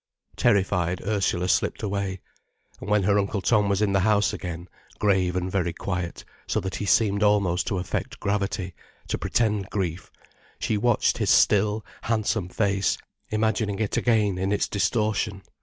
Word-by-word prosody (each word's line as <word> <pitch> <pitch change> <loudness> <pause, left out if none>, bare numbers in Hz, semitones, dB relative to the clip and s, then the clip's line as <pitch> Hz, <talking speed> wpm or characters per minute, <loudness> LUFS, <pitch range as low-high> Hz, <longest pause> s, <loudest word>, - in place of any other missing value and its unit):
Terrified, 90 -3 +2
Ursula 95 -4 0
slipped - - 0
away. 100 -2 -2 0.6
And - - -7
when 105 -1 +3
her 100 +2 +3
Uncle 100 +1 -1
Tom 105 +1 +2
was 100 +1 +1
in 100 - +1
the 95 - +3
house 105 +1 +2
again, 85 -1 -6 0.3
grave 95 -3 +2
and 90 0 -2
very 90 -3 0
quiet, 90 -1 -4 0.2
so - - 0
that 95 - -4
he 105 - -4
seemed 100 +2 +3
almost 100 -4 +2
to 100 - -1
affect 90 0 -4
gravity, 100 -2 -2 0.4
to - - -1
pretend 105 -4 0
grief, 95 -3 -3 0.5
she 110 - -1
watched 115 +2 +2
his - - 0
still, 105 +1 +3 0.2
handsome 110 -4 -1
face, 100 0 +1 0.3
imagining 110 -1 0
it 110 -1 -1
again 105 -6 +2
in 95 +1 -1
its 105 - +1
distortion. 105 -1 0
100 Hz, 155 wpm, -25 LUFS, 95-105 Hz, 0.6 s, when